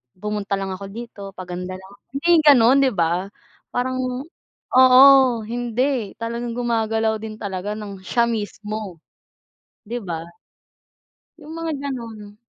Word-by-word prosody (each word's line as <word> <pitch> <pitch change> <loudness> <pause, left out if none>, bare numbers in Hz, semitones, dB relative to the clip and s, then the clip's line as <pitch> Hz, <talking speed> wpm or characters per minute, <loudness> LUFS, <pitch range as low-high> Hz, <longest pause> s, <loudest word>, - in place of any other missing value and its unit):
pumunta 205 0 -3
lang 195 -1 -4
ako 190 +1 -6
dito, 225 0 -9
paganda 180 0 -6
lang 190 +1 -12
ako. 200 - -20
Hindi 290 +5 -1
gano'n, 270 -5 +6
'di 270 -2 +3
ba? 175 +3 0 0.4
Parang 255 +1 -2 0.8
oo, 255 0 +8 0.4
hindi, 240 0 -2
talagang 235 +1 -4
gumagalaw 225 -2 0
din 215 0 -7
talaga 200 -1 -4
nang 205 -3 -7
siya 235 +5 +1
mismo, 215 -4 -4 0.9
'di 240 +3 -4
ba? 165 -5 -5 1.1
Yung 310 -1 -11
mga 330 -1 -3 0.2
gano'n. 220 -5 -7
220 Hz, 125 wpm, -22 LUFS, 200-245 Hz, 1.1 s, oo